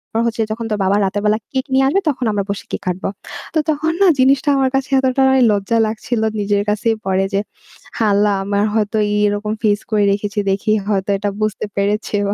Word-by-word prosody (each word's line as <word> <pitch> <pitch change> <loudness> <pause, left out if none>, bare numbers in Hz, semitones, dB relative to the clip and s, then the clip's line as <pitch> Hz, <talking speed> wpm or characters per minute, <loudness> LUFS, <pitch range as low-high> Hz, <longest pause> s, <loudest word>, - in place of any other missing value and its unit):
রা - - +2
হচ্ছে 225 0 -2
যখন 230 +1 -4
তোর 210 - -1
বাবা 190 +1 +2
রাতের 200 +2 -2
বেলা 210 +1 +3
কেক 260 -1 -1
নিয়ে 270 0 +4
আসবে 380 +9 +2
তখন 260 -3 -2
আমরা 205 -1 -1
বসে 200 0 -4
কেক - - -3
কাটবো। 180 +1 -2 0.5
তো - - +4
তখন 310 +1 0
না 395 - +6
জিনিসটা 270 +3 +3
আমার 265 -1 +2
কাছে 270 0 -1
এতটাই 265 0 +3
লজ্জা 205 +3 0
লাগছিল 220 +1 -3 0.2
নিজের 205 0 0
কাছেই 220 +2 +1
পরে 190 0 +1
যে, 195 - +2 0.6
আ - - +4
আল্লাহ 205 +1 +3
আমার 200 +1 0
হয়তো 215 0 0
এই 210 - +1
এরকম 205 +1 -2
face 205 -1 +1
করে 210 -1 +2
রেখেছি 205 +1 -2
দেখি 195 +2 0 0.2
হয়তো 195 -1 -1
এটা 205 +1 -2
বুঝতে 215 -1 -1
পেরেছে 205 +2 -1
বা 200 - 0
210 Hz, 210 wpm, -18 LUFS, 200-255 Hz, 0.6 s, না